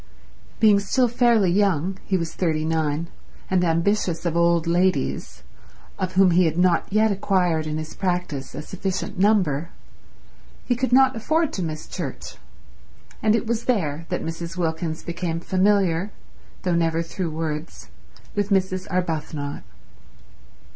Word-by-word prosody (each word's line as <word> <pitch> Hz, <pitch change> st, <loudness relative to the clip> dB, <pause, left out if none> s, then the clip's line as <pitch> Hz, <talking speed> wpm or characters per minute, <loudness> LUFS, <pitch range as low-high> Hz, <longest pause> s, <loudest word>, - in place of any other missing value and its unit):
Being 210 Hz, -3 st, +6 dB
still 245 Hz, +6 st, +2 dB
fairly 235 Hz, -5 st, +3 dB
young—he 190 Hz, 0 st, +1 dB
was 165 Hz, -2 st, -4 dB
thirty 155 Hz, -3 st, 0 dB
nine—and 160 Hz, +3 st, -2 dB
ambitious 170 Hz, 0 st, +1 dB
of 170 Hz, -1 st, 0 dB
old 170 Hz, -1 st, +3 dB
ladies, 70 Hz, -, 0 dB, 0.6 s
of 185 Hz, -1 st, -2 dB
whom 190 Hz, -1 st, +5 dB
he 180 Hz, +1 st, +4 dB
had 160 Hz, 0 st, 0 dB
not 180 Hz, 0 st, +2 dB
yet 215 Hz, +1 st, +3 dB
acquired 180 Hz, -5 st, +1 dB
in 155 Hz, 0 st, -2 dB
his 155 Hz, 0 st, -6 dB
practice 175 Hz, -8 st, -3 dB
a 150 Hz, -, -5 dB
sufficient 190 Hz, +1 st, -4 dB
number, 180 Hz, -7 st, +2 dB, 1.0 s
he 245 Hz, -, +1 dB
could 255 Hz, +1 st, -1 dB
not 265 Hz, 0 st, +5 dB
afford 315 Hz, +8 st, 0 dB
to 190 Hz, -, -3 dB
miss 155 Hz, -1 st, -5 dB
church, -, -, -6 dB, 0.8 s
and 215 Hz, 0 st, +3 dB
it 230 Hz, -, -1 dB
was 230 Hz, 0 st, -2 dB
there 165 Hz, -, -1 dB
that -, -, -2 dB
Mrs. 170 Hz, +2 st, -5 dB
Wilkins 160 Hz, -1 st, -2 dB
became 170 Hz, -1 st, -3 dB
familiar, 190 Hz, 0 st, +2 dB, 0.5 s
though 180 Hz, -, +1 dB
never 165 Hz, -1 st, +1 dB
through 170 Hz, +1 st, -4 dB
words, 155 Hz, 0 st, -5 dB, 0.4 s
with 205 Hz, -1 st, -1 dB
Mrs. 190 Hz, -2 st, 0 dB
Arbuthnot. 155 Hz, -5 st, -2 dB
180 Hz, 135 wpm, -23 LUFS, 160-200 Hz, 1.0 s, Being